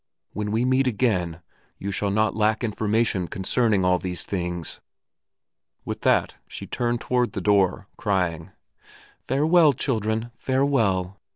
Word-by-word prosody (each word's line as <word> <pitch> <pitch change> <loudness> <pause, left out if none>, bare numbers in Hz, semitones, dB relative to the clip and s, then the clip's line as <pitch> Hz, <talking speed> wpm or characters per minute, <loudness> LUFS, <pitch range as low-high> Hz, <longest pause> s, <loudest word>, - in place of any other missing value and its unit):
When 105 0 -3
we 110 +4 +1
meet 130 +1 +2
again 90 -8 0 0.3
you 100 - -4
shall 100 +1 -1
not 110 +2 +1
lack 110 +1 +1
information 110 -3 0
concerning 100 +1 +1
all 90 0 +3
these 90 -1 -4
things." 90 -3 -3 1.0
With - - -5
that - - +2
she - - -7
turned 120 -1 -1
toward 125 -1 0
the - - -3
door, 100 -2 +2
crying, 90 -5 -1 0.8
"Farewell, 155 +3 +4
children, 110 -3 -1
farewell!" 115 -9 0
105 Hz, 125 wpm, -24 LUFS, 95-120 Hz, 1.0 s, Farewell